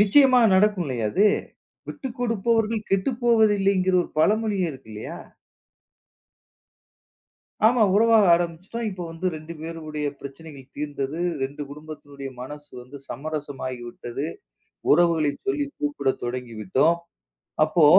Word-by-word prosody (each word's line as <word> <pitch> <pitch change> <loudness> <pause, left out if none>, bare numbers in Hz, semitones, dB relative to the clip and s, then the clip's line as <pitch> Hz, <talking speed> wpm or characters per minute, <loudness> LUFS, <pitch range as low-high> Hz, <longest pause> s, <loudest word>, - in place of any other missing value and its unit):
நிச்சயமா 255 +5 +6 0.2
நடக்கும் 195 -2 +3
இல்லையா 120 -5 -2
அது? 205 +3 +4 0.6
விட்டுக்கொடுப்பவர்கள் 230 -4 -1
கெட்டுப்போவதில்லைங்கிற 200 -4 +3
ஒரு - - -10
பழமொழியே 205 +1 +2
இருக்கு 130 -5 -12
இல்லையா? 105 - -7 2.5
ஆமா. 235 0 +4
உறவாக 225 -1 +6
ஆரம்பிச்சிட்டோம். 175 +7 -3
இப்ப 185 -2 -6
வந்து 165 +3 -4
ரெண்டு 155 +2 -8
பேருடைய 155 -2 -5
பிரச்சனைகள் 140 -1 -10
தீர்ந்தது. 145 +1 -3 0.2
ரெண்டு 145 +2 -5
குடும்பத்துனுடைய 145 -2 -9
மனசு 145 +3 -9
வந்து 135 +3 -11
சமரசமாகிவிட்டது. 130 -2 -5 0.7
உறவுகளை 165 -2 +4 0.2
சொல்லி 295 -8 0
கூப்பிட 145 -2 0
தொடங்கிவிட்டோம். 125 - 0 0.7
அப்போ 155 0 +3
165 Hz, 95 wpm, -24 LUFS, 140-210 Hz, 2.5 s, நிச்சயமா